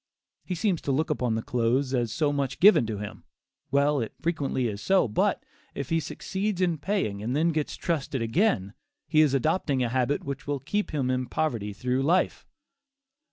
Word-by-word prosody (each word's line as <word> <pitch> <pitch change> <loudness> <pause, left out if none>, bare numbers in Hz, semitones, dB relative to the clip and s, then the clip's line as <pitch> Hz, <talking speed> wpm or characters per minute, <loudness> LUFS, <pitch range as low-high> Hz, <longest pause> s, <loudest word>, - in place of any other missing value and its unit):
He 180 - -3
seems 175 -1 0
to 140 - -1
look 155 +4 0
upon 125 -6 0
the 110 - -2
clothes 125 +3 0
as 120 -4 0
so 150 -2 +1
much 140 -2 -2
given 195 - +6
to 110 -2 -3
him; 105 0 -7 0.5
well, 140 +1 +2
it 115 -3 -3
frequently 145 -6 -1
is 105 -2 -5
so, 190 -7 +3
but, 105 - 0 0.3
if 140 - -4
he 165 - +2
succeeds 190 +6 -3
in 175 -4 +1
paying 140 - -1
and 120 +5 -2
then 160 +3 +3
gets 155 -2 -2
trusted 150 -5 -2
again, 115 - +1 0.3
he 155 0 +4
is 145 -3 +3
adopting 140 -2 +1
a 120 - 0
habit 130 +3 0
which 140 0 -6
will 145 -1 -1
keep 205 +11 -2
him 135 -4 -1
in 130 0 -1
poverty 115 -10 -1
through 125 +5 -1
life. 170 +6 +1
140 Hz, 190 wpm, -27 LUFS, 125-160 Hz, 0.5 s, given